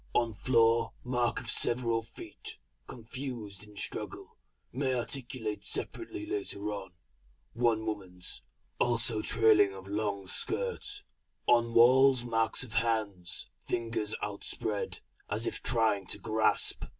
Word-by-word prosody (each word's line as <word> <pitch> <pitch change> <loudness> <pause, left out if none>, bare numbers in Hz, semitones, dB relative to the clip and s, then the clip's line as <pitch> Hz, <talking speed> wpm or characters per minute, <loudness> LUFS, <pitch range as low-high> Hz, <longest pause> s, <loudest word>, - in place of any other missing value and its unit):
On 115 -2 +2
floor, 115 0 +3
mark 125 -1 0
of - - -3
several 115 -1 +4
feet 115 +1 -9 0.3
confused 115 -4 -6
in 105 -1 -16
struggle, - - -4 0.4
may 130 0 0
articulate 120 -4 -2
separately 340 - -3
later 320 - -3
on 95 -2 -7 0.6
one 115 -2 +1
woman's 95 -5 -4 0.4
also 120 -2 +3
trailing 110 -3 +4
of 95 0 -10
long 100 -1 -2
skirt. 410 - +1 0.4
On 115 -1 +3
walls 130 +1 +6
marks 115 +1 +2
of 120 -3 -7
hands, 105 -7 0 0.2
fingers 115 -2 -1
outspread, 105 0 -3 0.3
as 110 +3 -1
if - - -3
trying 110 -5 +1
to - - 0
grasp. 110 -1 +1
115 Hz, 115 wpm, -31 LUFS, 105-125 Hz, 0.6 s, walls